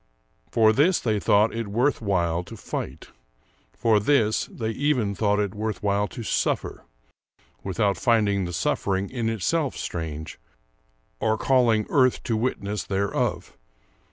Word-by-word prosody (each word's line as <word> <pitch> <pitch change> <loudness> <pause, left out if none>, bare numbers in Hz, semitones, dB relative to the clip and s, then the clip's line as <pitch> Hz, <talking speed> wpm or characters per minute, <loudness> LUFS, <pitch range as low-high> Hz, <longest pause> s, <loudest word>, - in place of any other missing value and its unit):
For 110 -1 +4
this 160 - +3
they 110 -3 0
thought 105 +2 +3
it 115 -1 -3
worth 120 +8 +1
while 90 -5 0
to 115 - -10
fight, - - -6 0.6
for 110 -2 +2
this 110 -1 +2
they 110 -1 -4
even 125 -5 0
thought 105 0 +1
it 100 -2 -1
worth 110 -1 -4
while 100 0 +1
to 120 - -8
suffer, - - -1 0.8
without 95 +1 0
finding 100 -3 +2
the 90 - -5
suffering 95 +3 -1
in 120 -3 -1
itself 135 - -1
strange, 80 -2 -5 0.8
or 110 0 +1
calling 120 -5 +3
earth 130 -3 +3
to 115 - -1
witness 105 -4 -2
thereof.... 100 +3 -2
110 Hz, 135 wpm, -25 LUFS, 100-115 Hz, 0.8 s, For